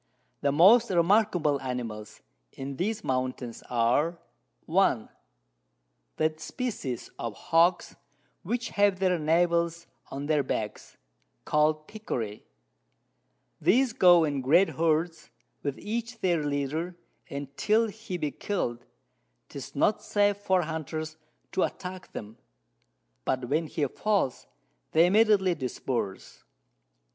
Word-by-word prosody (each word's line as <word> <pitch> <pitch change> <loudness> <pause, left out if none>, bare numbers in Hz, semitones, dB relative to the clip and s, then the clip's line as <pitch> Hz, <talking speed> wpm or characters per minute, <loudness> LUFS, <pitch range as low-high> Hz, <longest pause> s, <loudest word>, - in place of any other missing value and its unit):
The 140 - +2
most 210 - +6
remarkable 175 -5 +3
Animals 120 -5 -5 0.3
in 135 0 -6
these 215 +4 -2
Mountains 130 -2 -2
are, 125 +8 +2 0.5
1. - - +2 1.1
that 155 0 0
Species 160 - -4
of 115 -3 -4
Hogs 170 +2 +2 0.5
which 235 +6 -2
have 200 -2 +3
their 185 -2 +1
Navels 170 +1 +1 0.2
on 140 +1 -5
their 150 -1 +2
Backs, 110 -5 -4 0.5
call'd 155 0 +2
Pecarys, 120 - -4 1.2
these 255 +3 +3
go 175 -2 +6
in 145 -3 -1
great 165 +9 +4
Herds, 165 +1 0 0.3
with 140 -2 -3
each 230 +2 -4
their 170 -4 +1
Leader, 145 +5 -2 0.3
and 140 0 -6
till 220 +6 +2
he 210 -3 -6
be 150 -4 -2
kill'd, 120 - -3 0.7
'tis 135 -3 -9
not 210 +9 +2
safe 205 -1 +2
for 190 -3 +1
Hunters 155 0 -4 0.4
to - - 0
attack 185 0 -4
them, 110 +1 -8 0.9
but 125 - -1
when 155 +3 +1
he 150 0 -1
falls, 195 -1 -1 0.5
they 165 +2 +6
immediately 200 -1 +4
disperse. 125 - -4
165 Hz, 115 wpm, -28 LUFS, 140-190 Hz, 1.2 s, most